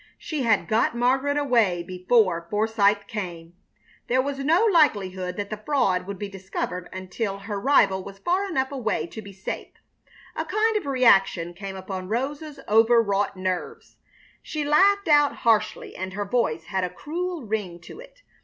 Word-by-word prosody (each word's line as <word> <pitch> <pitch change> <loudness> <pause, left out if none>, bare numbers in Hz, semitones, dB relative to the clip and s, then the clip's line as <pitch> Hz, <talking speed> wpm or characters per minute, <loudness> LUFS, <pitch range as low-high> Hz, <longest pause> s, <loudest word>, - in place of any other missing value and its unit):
She 310 -3 -4
had 220 -8 +2
got 230 +2 +1
Margaret 265 +4 +1
away 230 -11 +2
before 180 -1 +1
Forsythe 210 -1 +2
came! 175 -6 -6 0.5
There 255 +2 +2
was 275 +1 -1
no 325 +10 +3
likelihood 195 - +2
that 205 0 -4
the 215 0 -5
fraud 195 -11 +1
would 200 -1 -5
be 205 - -4
discovered 185 -2 -5
until 190 +2 -4
her 200 0 -5
rival 195 -8 +3
was 195 0 -10
far 370 - 0
enough 265 -6 -1
away 220 - -2
to 220 +6 -9
be 200 -1 -11
safe. 190 0 -6 0.7
A - - -2
kind 440 +1 +1
of 400 -9 -1
reaction 195 -10 +3
came 195 +2 -7
upon 190 -1 -6
Rosa's 285 +5 -3
overwrought 215 -3 +3
nerves. 185 -1 -4 0.4
She 305 -2 -4
laughed 395 +7 +4
out 290 -2 +4
harshly, 225 -2 0
and 190 +1 -5
her 205 +1 -3
voice 195 -8 0
had 190 +2 -2
a 180 - -1
cruel 335 - -5
ring 205 -5 -3
to - - -12
it. - - -15
215 Hz, 165 wpm, -24 LUFS, 190-280 Hz, 0.7 s, laughed